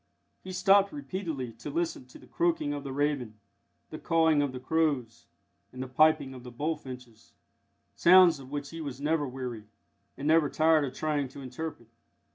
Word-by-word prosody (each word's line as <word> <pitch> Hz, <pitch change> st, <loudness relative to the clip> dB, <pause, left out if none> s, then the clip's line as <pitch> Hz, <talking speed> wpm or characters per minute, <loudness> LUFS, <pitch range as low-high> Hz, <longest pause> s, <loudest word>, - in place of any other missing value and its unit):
He 185 Hz, -, -7 dB
stopped 195 Hz, +2 st, +4 dB
repeatedly 180 Hz, -, -5 dB
to 145 Hz, -, -6 dB
listen 165 Hz, -4 st, -3 dB
to 125 Hz, -, -14 dB
the -, -, -17 dB
croaking 165 Hz, -4 st, 0 dB
of 145 Hz, -1 st, -5 dB
the 135 Hz, -, -6 dB
raven, 135 Hz, -6 st, -1 dB, 0.5 s
the 155 Hz, -, -7 dB
cawing 160 Hz, -3 st, +3 dB
of 145 Hz, -2 st, -1 dB
the 130 Hz, -, -7 dB
crows, 130 Hz, -5 st, -1 dB, 0.4 s
and 130 Hz, 0 st, -6 dB
the -, -, -7 dB
piping 135 Hz, 0 st, +3 dB
of 130 Hz, -, -10 dB
the 125 Hz, -, -8 dB
bullfinches 125 Hz, -4 st, -6 dB, 0.6 s
sounds 175 Hz, -3 st, +6 dB
of 130 Hz, -1 st, -12 dB
which 145 Hz, 0 st, -5 dB
he 165 Hz, 0 st, -7 dB
was 140 Hz, -4 st, -6 dB
never 150 Hz, 0 st, 0 dB
weary, 125 Hz, -4 st, -6 dB, 0.5 s
and 140 Hz, -, -4 dB
never 160 Hz, -2 st, +4 dB
tired 155 Hz, -1 st, +3 dB
of 130 Hz, -1 st, -7 dB
trying 150 Hz, -3 st, -1 dB
to 135 Hz, +2 st, -11 dB
interpret. 130 Hz, -2 st, -7 dB
145 Hz, 175 wpm, -29 LUFS, 130-160 Hz, 0.6 s, sounds